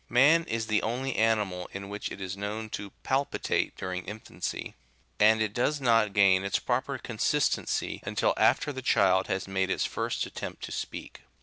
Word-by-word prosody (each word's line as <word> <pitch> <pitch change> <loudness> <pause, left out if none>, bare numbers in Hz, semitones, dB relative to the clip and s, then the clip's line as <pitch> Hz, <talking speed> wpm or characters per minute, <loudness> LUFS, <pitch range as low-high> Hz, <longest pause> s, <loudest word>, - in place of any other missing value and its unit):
Man 150 +7 +5
is 115 0 -2
the 105 -1 +1
only 125 +3 -2
ani 110 -1 +3
mal 90 -1 -6
in 100 0 -6
which 100 +1 -5
it - - -7
is 95 -1 -4
known 105 +2 -4
to 100 -1 -5
palpitate85 135 +2 0
during 90 -1 -4
infancy; 105 +3 -5 0.5
and 110 +1 +5
it 105 -2 -3
does 145 +6 +1
not 115 -5 +3
gain 95 -2 +5
its 100 - +1
proper 130 +2 -1
consistency 125 +4 0
until - - +1
after 145 - +3
the 130 - -5
child 95 -6 +3
has 95 0 -2
made 95 -1 0
its - - +1
first - - -2
attempt - - -7
to - - -5
speak. - - -6
110 Hz, 180 wpm, -28 LUFS, 95-125 Hz, 0.5 s, Man